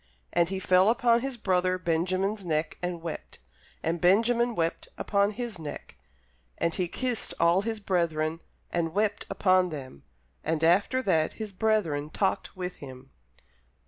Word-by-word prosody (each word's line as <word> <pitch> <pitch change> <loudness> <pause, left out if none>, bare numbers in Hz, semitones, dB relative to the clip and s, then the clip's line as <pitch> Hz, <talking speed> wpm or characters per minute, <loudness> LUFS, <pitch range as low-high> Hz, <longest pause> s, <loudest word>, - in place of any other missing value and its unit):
And 170 0 +3
he 190 - -2
fell 185 +1 +4
upon 235 0 +3
his 270 -1 -4
brother 185 -3 +1
Benjamin's 185 +4 0
neck, 155 -2 -1
and 175 -2 -3
wept; 165 - -6 0.5
and 165 +1 -1
Benjamin 230 +6 +3
wept 165 -2 -1
upon 200 0 +2
his 230 -4 -5
neck. 150 -2 -8 0.6
And 170 - 0
he 180 +1 0
kissed 245 +6 -2
all 170 +3 +4
his 220 +1 -3
brethren, 165 -5 0 0.3
and 165 0 -1
wept 210 0 0
upon 185 -2 +3
them; 130 - -8 0.4
and 160 0 -1
after 200 +10 +3
that 160 -7 +2
his 215 -2 -6
brethren 185 -8 0
talked 190 +1 -1
with 180 0 -4
him. 130 -1 -11
185 Hz, 145 wpm, -28 LUFS, 165-210 Hz, 0.6 s, fell